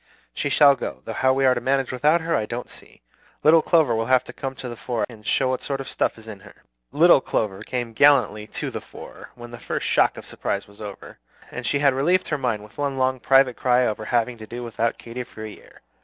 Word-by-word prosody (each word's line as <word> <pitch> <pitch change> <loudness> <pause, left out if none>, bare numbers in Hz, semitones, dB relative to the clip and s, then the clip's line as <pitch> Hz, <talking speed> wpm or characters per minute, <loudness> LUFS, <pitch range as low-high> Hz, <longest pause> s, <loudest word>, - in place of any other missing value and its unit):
She 140 - -2
shall 140 0 +6
go; - - -6
though 115 - -5
how 130 +4 +2
we 135 +1 +2
are 130 - +5
to 120 - -3
manage 135 +1 0
without 150 +6 +2
her 165 0 -1
I 105 - -1
don't 120 +2 -6
see. - - -14 0.4
Little 160 +1 +6
Clover 155 -7 +3
will 115 0 -1
have 130 -1 +4
to - - -11
come 135 0 -5
to 130 - -7
the 120 - -6
fore, 120 0 -2
and 110 -3 -14
show 130 +4 +1
what 130 - -2
sort 140 -1 -3
of 135 - -6
stuff - - -1
there 110 - -14
is 110 - -16
in 105 -3 -8
her." - - -17 0.3
"Little - - +5
Clover" 100 -2 -2
came 120 0 -4
gallantly 110 -6 +3
"to - - -5
the - - -5
fore" - - -12
when 120 -1 -11
the 120 - -9
first - - -4
shock - - +2
of - - -9
surprise 100 - -4
was 100 +1 -17
over, 100 -2 -9 0.3
and - - -5
she 145 - +1
had 140 -1 +3
relieved 175 +8 +1
her 150 - 0
mind 115 -5 -1
with 105 - -16
one 140 -2 -1
long 130 0 +1
private 135 -1 +4
cry 125 0 +2
over 110 -1 -3
having 120 0 0
to 110 - -10
do 120 +2 -7
without 115 0 -2
Katy 120 +2 -7
for 110 -2 -11
a 110 - -6
year. - - -17
125 Hz, 255 wpm, -23 LUFS, 115-135 Hz, 0.4 s, shall